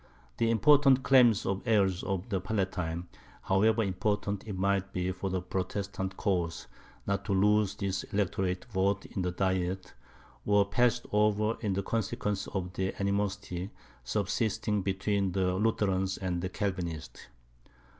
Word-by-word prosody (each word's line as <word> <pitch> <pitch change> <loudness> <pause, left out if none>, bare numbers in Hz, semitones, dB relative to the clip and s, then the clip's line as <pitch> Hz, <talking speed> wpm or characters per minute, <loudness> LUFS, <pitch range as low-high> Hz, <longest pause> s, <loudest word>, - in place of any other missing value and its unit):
The 115 - +2
important 135 +2 +5
claims 120 -6 +5
of 95 0 -1
the - - -5
heirs 95 -4 +3
of 95 +3 -3
the 95 -4 -1
Palatine, 90 -4 -2 0.4
however 110 +4 +3
important 100 +1 -1
it 100 -3 -4
might 100 0 0
be 90 0 -1
for 95 +1 -4
the 95 -1 -2
Protestant 95 +1 -3
cause 90 -5 -1 0.4
not 100 0 -1
to - - 0
lose 105 +1 +3
this 95 -1 -2
electorate 95 -2 -1
vote 100 -3 0
in 95 - -4
the 90 - 0
diet, 95 0 -1 0.5
were 105 -1 +4
passed 120 +4 +1
over 105 +1 +2
in 100 -4 -1
consequence 105 -2 -2
of 90 -2 -4
the 95 0 -3
animosity 100 -2 -2 0.3
subsisting 105 - 0
between 95 0 0
the 95 -1 +1
Lutherans 95 -2 +1
and 90 -2 -2
the 90 - -2
Calvinists. 90 - -4
95 Hz, 140 wpm, -30 LUFS, 95-105 Hz, 0.5 s, important